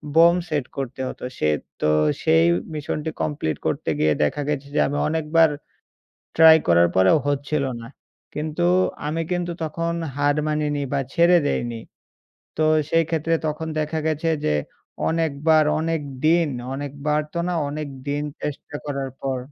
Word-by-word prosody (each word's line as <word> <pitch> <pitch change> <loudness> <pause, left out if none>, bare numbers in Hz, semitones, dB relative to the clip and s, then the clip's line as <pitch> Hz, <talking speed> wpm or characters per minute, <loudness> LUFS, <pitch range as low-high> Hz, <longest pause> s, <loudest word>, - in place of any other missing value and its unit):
Bomb 170 +2 +6
set 145 -4 -1
করতে 130 -1 -4
হতো। - - -9
সে - - +1 0.3
তো - - +1 0.4
সেই 80 +1 +4 0.3
মিশনটি 150 +1 -3
কমপ্লিট 80 - -2
করতে - - -2
গিয়ে 75 0 +3
দেখা 145 - 0
গেছে 140 -1 -2
যে - - +3
আমি 145 - -2
অনেকবার 160 +1 +3 0.9
ট্রাই 160 0 +8
করার 85 0 +5
পরেও 95 +10 +5
হচ্ছিল 145 +1 0 0.2
না। - - -9 0.5
কিন্তু 155 +3 -2 0.4
আমি 160 +2 -1
কিন্তু 175 -1 -1
তখন 165 +2 -2 0.2
হার 145 +1 +1
মানিনি 150 -1 -1
বা 140 - +1
ছেড়ে 175 0 +5
দেইনি। 120 -4 -2 0.8
তো 155 - +2 0.3
সেই 165 0 +3
ক্ষেত্রে 165 0 0
তখন 155 +1 -3
দেখা 155 +1 -2
গেছে 155 +1 0 0.2
যে - - +2 0.6
অনেকবার 160 -1 +2 0.2
অনেক 165 0 -1 0.3
দিন, 165 -1 +4 0.3
অনেকবার 145 +2 -2
তো - - -1
না - - -1 0.2
অনেকদিন 145 -1 -4 0.2
চেষ্টা 145 0 -6
করার 140 -2 -3
পর 135 -1 -1
150 Hz, 145 wpm, -23 LUFS, 140-160 Hz, 0.9 s, ট্রাই